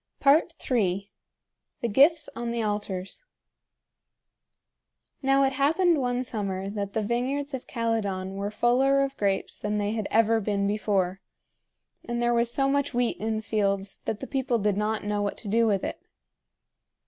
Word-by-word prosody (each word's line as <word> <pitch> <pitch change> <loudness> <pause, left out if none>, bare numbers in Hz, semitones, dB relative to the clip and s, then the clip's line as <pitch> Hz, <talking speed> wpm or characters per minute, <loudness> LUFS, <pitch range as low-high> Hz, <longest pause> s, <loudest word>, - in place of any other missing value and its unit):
III. 245 - +2 0.7
THE 235 - 0
GIFTS 290 +9 +4
ON 235 0 -3
THE 235 -1 -1
ALTARS. 205 - -3 2.0
Now 270 0 +3
it 270 0 +2
happened 315 +5 +3
one 250 -1 0
summer 195 -5 -3
that 200 -1 -4
the 220 - 0
vineyards 265 +6 -1
of 265 - -5
Calydon 205 -5 -2
were 200 +1 -2
fuller 260 +5 +3
of 275 0 -3
grapes 200 -4 -1
than 210 0 -1
they 205 0 0
had 220 -2 -2
ever 225 0 +3
been 200 -1 -1
before, 200 -2 0 0.8
and 240 0 -3
there 240 0 +2
was 235 0 +2
so 270 +2 +2
much 280 -1 0
wheat 245 -1 +1
in 220 +1 -2
the 215 - -5
fields 200 -2 -1
that 210 - -3
the - - -3
people 265 -3 0
did 205 -2 +1
not 210 +1 -1
know 205 0 -1
what 205 0 -2
to 215 - -9
do 230 +3 +3
with 200 -3 +1
it. - - -4
225 Hz, 160 wpm, -27 LUFS, 205-260 Hz, 2.0 s, GIFTS